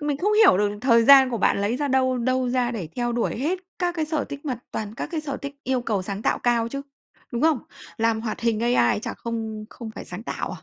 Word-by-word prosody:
c - - -11
mình 295 -1 0
không 410 +8 +1
hiểu 425 - +6
được 205 0 0
thời 235 -3 +4
gian 265 0 +8
của 235 - -2
bạn 200 - +2
lấy 205 +4 0
ra 290 +1 -1
đâu 260 -1 +2
đâu 255 +1 0
ra 245 -1 +1
để 205 -9 -5
theo 240 -1 0
đuổi 235 - -1
hết 325 +9 0 0.2
các 350 -1 0
cái 315 - 0
sở 310 -2 -1
tích, 285 +2 -8
mà 255 -5 -2
toàn 215 0 -5
các - - -4
cái 320 - -1
sở 280 -3 -4
thích 280 -1 -7
yêu 260 -1 0
cầu 210 -5 -1
sáng 200 +2 -5
tạo - - +1
cao 235 -1 +1
chứ, 275 +3 -5 0.5
đúng 235 - -2
không? 315 -4 +4 0.4
Làm 225 0 +1
hoạt 220 -1 -4
hình 230 -2 +1
AI 235 - +3
chả - - -5
không 220 -2 -5
không 230 -2 -8
phải - - -7
sáng 180 +5 -8
tạo - - -4
à? - - -9
240 Hz, 265 wpm, -24 LUFS, 225-275 Hz, 0.5 s, gian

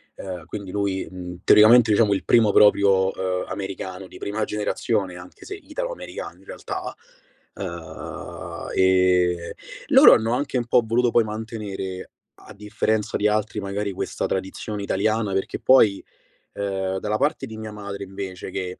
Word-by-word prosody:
Ehm, 90 -4 -7
quindi 100 +1 -7
lui, 100 -2 -2
mhmm, 90 -1 -8
teoricamente 110 +2 +7
diciamo 105 -1 +4
il 95 - -2
primo 110 -3 +4
proprio, 100 -2 +5
uhm, 95 -1 -2
americano 95 -1 -6
di - - -13
prima 105 +1 -2
generazione, 105 -2 -2
anche 90 0 -12
se 400 - -6
italo-americano - - -6
in - - -21
realtà. - - -6 0.6
Uhm, - - -7
ehm, 90 -2 +3 0.4
loro - - +8
hanno 115 +2 +2
anche 135 0 -1
un 120 - -1
po' 120 0 +3
voluto 120 +2 +2
poi 120 - +4
mantenere, 105 -4 -6 0.3
a 110 - -12
differenza 105 +1 -1
di 105 - +2
altri 105 0 -1
magari, 100 +1 -3
questa - - -3
tradizione 100 +2 -4
italiana, 105 +1 0
perché 95 - -2
poi, 110 -7 +4 0.5
ehm, 95 -1 -2
dalla 105 +2 -1
parte 140 +1 0
di 110 -3 -9
mia 110 -1 -7
madre 100 -1 -7
invece 95 -1 -7
che, 90 -1 -5
100 Hz, 150 wpm, -23 LUFS, 95-110 Hz, 0.6 s, loro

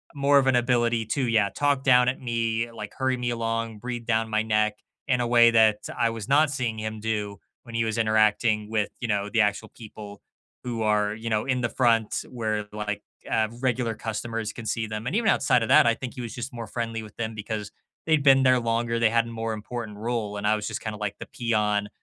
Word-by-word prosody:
more 140 0 +4
of 135 - +1
an 130 - +4
ability 120 -2 +2
to, 130 +1 0
yeah, 110 -3 +3
talk 145 -2 +1
down 125 -2 +5
at 130 - -3
me, 115 -1 -1
like 105 -2 -8
hurry 130 -1 +1
me 125 -1 -2
along, 115 -1 -2
breathe 120 +1 -5
down 110 -1 +1
my 110 0 +1
neck 105 -1 +1 0.3
in 125 -2 +2
a 120 - 0
way 120 -1 +6
that 110 -2 +5 0.2
I 115 -1 +2
was 115 0 -6
not 145 +2 +4
seeing 120 -5 -2
him 110 0 -4
do 105 -2 -3 0.3
when 115 -2 -10
he 115 - +2
was 110 +1 -2
interacting 110 -1 +2
with, 105 -2 0
you 115 - -3
know, 105 -1 -1
the 115 - +3
actual 105 +1 0
people 105 -3 -11 0.4
who 115 -3 -3
are, 105 0 +1
you 115 +1 -8
know, 110 -1 0
in 130 -2 0
the 120 - 0
front 115 -4 +1
where, 110 -3 -2
like, 105 -1 -4 0.3
uh, 110 -1 +2
regular 125 -3 0
customers 115 0 -4
can 115 - -8
see 110 +1 -1
them. 110 +2 -5
And 170 - -2
even 225 -1 +1
outside 120 -2 +3
of - - -3
that, - - +7
I 115 - +4
think 130 -2 -7
he 125 - -6
was 115 - -6
just 125 +1 -6
more 115 -2 -6
friendly 115 -2 -3
with 110 - -12
them 110 -1 -3
because 105 -1 -5 0.3
they'd 155 -3 +3
been 135 -1 +6
there 130 -1 +5
longer, 115 0 -1
they 115 -1 +4
had 115 0 +2
a - - -8
more 115 -1 -3
important 110 -1 -6
role. 110 -2 -3
And 100 - -4
I 110 +1 +3
was 105 -1 -4
just - - -4
kind 110 -1 -4
of 105 - -9
like 105 -1 -3
the - - -6
peon. 105 -3 0
115 Hz, 235 wpm, -25 LUFS, 110-120 Hz, 0.4 s, that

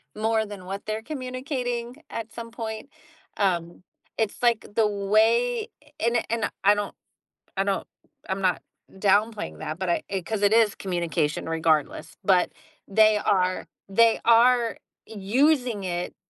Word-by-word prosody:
more 220 0 +1
than 200 -3 -9
what 195 +2 -6
they're 215 +1 -3
communicating 255 -1 -4
at 230 0 -5
some 230 -1 -8
point, 225 +3 -6 0.5
um, 175 -3 -1 0.4
it's, 220 +1 -1
like, 235 -2 +3
the 225 - +4
way 220 +4 +2 0.3
and 235 0 +1
and 230 -1 -1
I 205 +1 +6
don't 205 -1 -3 0.6
I 195 - +2
don't 195 -1 -1 0.4
I'm 190 +1 -2
not 185 -2 +1 0.3
downplaying 200 - +1
that, 155 - -5
but 185 - -3
I 170 - +1 0.2
'cause 215 -2 -2
it 205 - +4
is 225 -2 +4
communication 170 -5 -2
regardless, 160 -1 0
but 185 -2 +4 0.4
they 215 +1 +5
are 185 -3 +1 0.2
they 225 +3 +4
are 235 0 +5 0.3
using 235 +1 +1
it 175 -1 -3
215 Hz, 135 wpm, -25 LUFS, 190-230 Hz, 0.6 s, I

